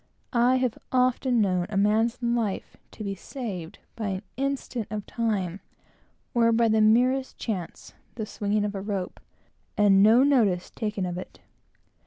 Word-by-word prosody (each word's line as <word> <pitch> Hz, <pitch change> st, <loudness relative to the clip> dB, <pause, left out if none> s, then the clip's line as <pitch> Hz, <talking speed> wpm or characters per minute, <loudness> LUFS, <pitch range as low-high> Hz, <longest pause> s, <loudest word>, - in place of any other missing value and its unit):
I 245 Hz, +1 st, +4 dB
have 255 Hz, -3 st, 0 dB
often 255 Hz, -1 st, +2 dB
known 185 Hz, -3 st, +1 dB
a 205 Hz, -, -2 dB
man's 220 Hz, +4 st, +2 dB
life 235 Hz, -4 st, -1 dB
to 215 Hz, -, -9 dB
be 200 Hz, -1 st, -2 dB
saved 195 Hz, -, -7 dB, 0.2 s
by 220 Hz, -2 st, -3 dB
an 190 Hz, 0 st, -3 dB
instant 265 Hz, -4 st, -3 dB
of 210 Hz, -1 st, -4 dB
time, 200 Hz, -6 st, -2 dB, 0.7 s
or 230 Hz, -1 st, +4 dB
by 230 Hz, 0 st, +3 dB
the 220 Hz, 0 st, +3 dB
merest 250 Hz, +5 st, +3 dB
chance, 190 Hz, -7 st, -5 dB, 0.2 s
the 220 Hz, -2 st, -3 dB
swinging 205 Hz, 0 st, -1 dB
of 205 Hz, -, -3 dB
a 195 Hz, -, -4 dB
rope, 195 Hz, -2 st, -4 dB, 0.6 s
and 200 Hz, -2 st, +5 dB
no 225 Hz, +5 st, +6 dB
notice 220 Hz, -11 st, +2 dB
taken 210 Hz, -3 st, -3 dB
of 175 Hz, 0 st, -4 dB
it. -, -, -10 dB
215 Hz, 155 wpm, -26 LUFS, 195-240 Hz, 0.7 s, no